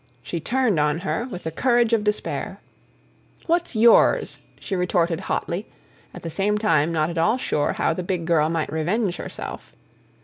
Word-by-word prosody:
she 170 +6 -4
turned 235 0 +1
on 150 +2 +1
her, 225 +5 -2
with 180 -5 -7
the 160 - -3
courage 240 - +2
of 220 -2 +2
despair. 210 0 -2 0.9
"What's 340 -5 0
yours?" 230 +1 +4 0.2
she 195 - -4
retorted 175 -2 +1
hotly, 180 +5 -2 0.4
at - - -11
the 165 - -4
same 205 +4 +1
time 165 -7 +2
not 160 0 0
at 170 - -3
all 190 +9 +3
sure 150 - 0
how - - 0
the 180 - -4
big 180 -2 -3
girl 160 -2 +2
might 165 -2 -2
revenge 180 +5 0
herself. - - -7
180 Hz, 170 wpm, -23 LUFS, 165-220 Hz, 0.9 s, yours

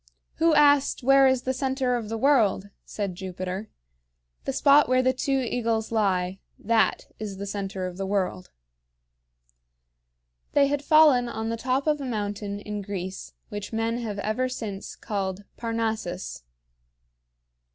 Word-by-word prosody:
"Who 330 -1 +4
asked 285 -2 +4
where 270 +1 +6
is 260 -1 +2
the 260 - 0
center 265 -1 0
of 225 -3 -4
the 225 - -2
world?" 220 -7 +2
said 200 -3 -4
Jupiter. 185 +2 -5 0.8
"The - - 0
spot 285 +1 +5
where 255 0 +3
the 260 0 +3
two 270 +1 0
eagles 230 -3 -1
lie 190 -4 0 0.2
that 225 0 +1
is 205 -3 -5
the 200 - -5
center 195 -2 -4
of 180 -1 -6
the 195 - -3
world." 185 -2 -1 2.0
They 285 - +5
had 285 +1 -1
fallen 290 -6 +5
on 220 0 -3
the 230 - -1
top 255 +4 -1
of 300 -2 +1
a - - -4
mountain 205 -3 -3
in 210 0 -5
Greece 190 -1 -6 0.2
which 205 -2 -6
men 225 +1 -1
have 215 -4 -4
ever 215 +6 -1
since 210 -6 -6
called 195 -1 -3
Parnassus. 220 - -3
225 Hz, 145 wpm, -26 LUFS, 200-260 Hz, 2.0 s, where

